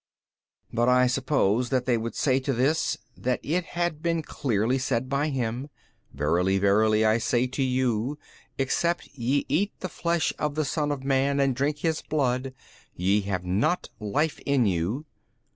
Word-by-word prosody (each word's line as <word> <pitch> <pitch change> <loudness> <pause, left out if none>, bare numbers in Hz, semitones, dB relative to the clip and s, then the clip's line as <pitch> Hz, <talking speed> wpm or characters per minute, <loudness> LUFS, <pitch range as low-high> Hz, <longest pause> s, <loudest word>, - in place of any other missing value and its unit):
B. - - -9
But 120 +1 +3
I 125 0 +5
suppose 125 -3 +1
that 130 -2 0
they 125 - +2
would 115 0 -3
say 130 -2 +2
to 135 +1 -1
this, 135 +6 +1 0.2
that 125 0 -1
it 175 +5 0
had 175 -3 -1
been 165 -1 0
clearly 125 -2 0
said 130 -1 -1
by 140 +3 0
Him, 125 0 -2 0.4
Verily 85 +7 +1
verily 105 +2 +3
I 110 +1 +3
say 120 +2 +1
to 130 +2 -4
you, 130 0 0 0.4
except 170 +6 0
ye 135 +2 0
eat 200 +4 0
the 185 - -4
flesh 170 -2 0
of 150 -1 -1
the 155 -1 0
Son 150 0 -1
of 140 -2 -4
man 135 +1 +1
and 135 -2 +2
drink 145 +4 0
His 160 -1 0
blood, 130 -3 -1 0.4
ye 95 +4 +2
have 95 -2 -2
not 110 - 0
life 145 +9 -1
in 140 -4 +2
you. 100 - -1
130 Hz, 170 wpm, -26 LUFS, 115-145 Hz, 0.4 s, I